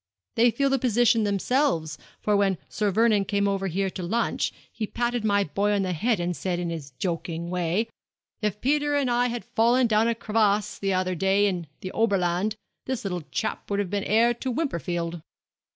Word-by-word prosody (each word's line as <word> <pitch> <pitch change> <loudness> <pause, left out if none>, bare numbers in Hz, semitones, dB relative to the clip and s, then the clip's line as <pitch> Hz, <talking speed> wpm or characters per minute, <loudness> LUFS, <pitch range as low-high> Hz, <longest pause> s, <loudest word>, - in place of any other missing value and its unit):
They 235 +2 +5
feel 275 +3 +1
the 270 - +2
position 240 -2 +3
themselves; 200 - 0 0.2
for 210 - +1
when 195 -2 +2
Sir 210 -1 -1
Vernon 215 0 +3
came 200 +1 0
over 195 -1 0
here 190 +2 -1
to 185 - -6
lunch, 225 +7 0 0.2
he 215 - -4
patted 240 0 -1
my 200 -1 +3
boy 200 +6 0
on 200 -1 +1
the 185 -1 -1
head 215 +5 +1
and 175 0 -1
said, 180 0 -2
in 175 -1 -2
his 155 -4 -6
joking 170 0 -3
way, 180 +5 0 0.5
"If 210 -1 -2
Peter 290 +2 +1
and 275 -3 +1
I 245 +1 +2
had 240 -1 -4
fallen 240 +3 +3
down 220 0 +3
a 235 - +1
crevasse 210 -2 +1
the 195 -1 0
other 185 0 0
day 195 +3 +2
in 180 -5 -1
the 185 - -5
Oberland, 200 -2 +1 0.3
this 260 -5 -3
little 180 -3 -2
chap 220 - -3
would 200 - 0
have 200 -3 -2
been 200 -1 -1
heir 230 +3 +4
to 250 +2 -5
Wimperfield."' 175 - -2
205 Hz, 195 wpm, -26 LUFS, 180-235 Hz, 0.5 s, They